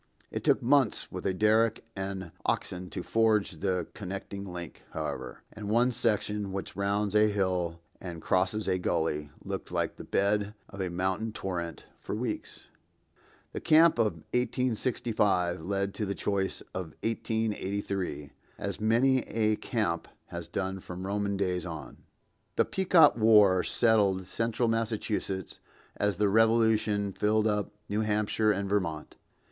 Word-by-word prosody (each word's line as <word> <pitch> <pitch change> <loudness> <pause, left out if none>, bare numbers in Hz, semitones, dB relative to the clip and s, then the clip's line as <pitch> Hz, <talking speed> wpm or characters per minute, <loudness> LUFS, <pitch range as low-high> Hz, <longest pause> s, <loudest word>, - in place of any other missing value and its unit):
It - - -4
took - - +3
months 130 -2 +2
with 90 0 -3
a 95 - +1
derrick 110 +2 +3
and 95 -3 -4
oxen 90 0 -2
to 90 - -5
forge 110 -6 +2
the 95 -1 0
connecting 100 0 -6
link, 85 -3 -7
however; - - -5
and 105 -1 -6
one 120 +3 +3
section, 105 -3 0
which 95 0 -5
rounds 100 0 0
a 105 0 +6
hill 90 -5 0 0.2
and 85 -3 -6
crosses 95 +5 +1
a 95 -1 +1
gully, 80 -4 -1 0.2
looked - - -5
like - - -1
the - - -8
bed 105 +1 +1
of 100 - -7
a 95 - -1
mountain 95 +5 -1
torrent 85 -6 -4
for - - -4
weeks. - - -4 0.9
The - - -3
camp 160 -3 +5
of 110 -2 +3 0.2
1865 115 -8 +1
led 100 +2 -1
to 105 0 -2
the 100 - -2
choice 100 -2 -1
of 90 -4 -5
1883, 100 -7 -2 0.3
as - - -4
many 125 +5 +4
a 110 -1 +1
camp 100 -8 -1 0.2
has - - -6
done 95 0 -3
from 90 0 -7
Roman 100 0 -1
days 90 -2 0
on. 80 -6 -7 0.6
The - - +3
Pequot 180 -5 +5
war 105 -5 +6
settled 100 -5 +2
central 115 +4 0
Massachusetts 110 -4 -2 0.4
as 105 -2 +1
the 105 +1 +3
Revolution 110 -2 +3
filled 105 +2 +2
up 105 -2 +1 0.2
New 105 +2 0
Hampshire 105 0 +2
and 100 -1 -1
Vermont. 95 -6 -2
100 Hz, 140 wpm, -29 LUFS, 95-110 Hz, 0.9 s, a